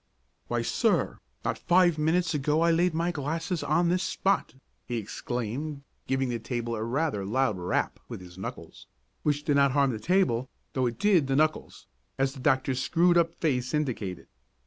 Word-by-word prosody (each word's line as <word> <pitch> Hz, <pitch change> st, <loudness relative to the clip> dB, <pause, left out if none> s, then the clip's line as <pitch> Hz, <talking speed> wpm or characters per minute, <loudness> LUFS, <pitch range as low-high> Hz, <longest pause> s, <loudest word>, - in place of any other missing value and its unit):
"Why, -, -, -1 dB
sir, -, -, +1 dB, 0.3 s
not -, -, -1 dB
five 175 Hz, -3 st, +3 dB
minutes 165 Hz, +3 st, +2 dB
ago 150 Hz, +2 st, +1 dB
I 170 Hz, 0 st, +4 dB
laid 170 Hz, 0 st, +2 dB
my 170 Hz, +2 st, +1 dB
glasses 165 Hz, +3 st, -2 dB
on 170 Hz, 0 st, +2 dB
this 180 Hz, +1 st, +1 dB
spot!" 195 Hz, -6 st, 0 dB, 0.3 s
he 120 Hz, -, -2 dB
exclaimed, 125 Hz, +6 st, -4 dB, 0.2 s
giving 135 Hz, -1 st, 0 dB
the 120 Hz, -1 st, -2 dB
table 120 Hz, 0 st, -3 dB
rather 130 Hz, 0 st, -1 dB
a -, -, -5 dB
loud 120 Hz, -3 st, +1 dB
rap 90 Hz, +1 st, -1 dB
with -, -, -6 dB
his 90 Hz, -1 st, -12 dB
knuckles, 95 Hz, -, -8 dB, 0.3 s
which 145 Hz, -1 st, 0 dB
did 145 Hz, -2 st, +2 dB
not 140 Hz, -2 st, +4 dB
harm 140 Hz, -2 st, +3 dB
the 110 Hz, -, -4 dB
table, 135 Hz, -, +1 dB, 0.2 s
though 130 Hz, -2 st, +1 dB
it 120 Hz, -, -4 dB
did 195 Hz, -9 st, +3 dB
the 135 Hz, -, +1 dB
knuckles, 155 Hz, +2 st, 0 dB, 0.3 s
as 135 Hz, 0 st, +1 dB
the 135 Hz, -, -10 dB
doctor's 130 Hz, -1 st, +1 dB
screwed 175 Hz, +4 st, +3 dB
up 170 Hz, -1 st, +2 dB
face 125 Hz, -4 st, 0 dB
indicated. 115 Hz, -, -2 dB
140 Hz, 175 wpm, -28 LUFS, 125-165 Hz, 0.3 s, I